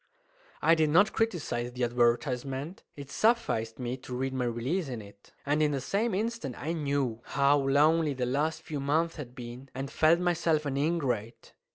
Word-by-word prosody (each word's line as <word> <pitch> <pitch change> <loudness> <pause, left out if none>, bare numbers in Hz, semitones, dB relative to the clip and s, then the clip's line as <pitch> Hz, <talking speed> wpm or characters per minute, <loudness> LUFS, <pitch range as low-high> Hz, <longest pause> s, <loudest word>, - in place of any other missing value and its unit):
I 165 +2 +6
did 160 -2 +3
not 190 +8 +4
criticise 145 - -1
the 125 0 -2
advertisement. 125 +6 0
It 140 -1 -9
sufficed 215 - +1
me 125 0 -3
to 125 -1 -7
read 130 +1 -2
my 130 -1 -1
release 130 +9 -1
in 120 -3 -4
it; 100 -1 -15
and 145 +2 +1
in 150 - +4
the 140 - 0
same 205 - 0
instant 215 - -2
I 160 +3 -2
knew 140 -7 -1
how 140 +1 +3
lonely 145 +2 +3
the 125 -1 -1
last 155 +5 -1
few 150 -2 -4
months 160 +5 0
had 125 -5 -8
been, 125 +1 -9
and 135 +1 -4
felt 160 +2 +4
myself 165 -3 +1
an 140 -2 -2
ingrate. 140 -7 -2
140 Hz, 180 wpm, -29 LUFS, 125-160 Hz, -, I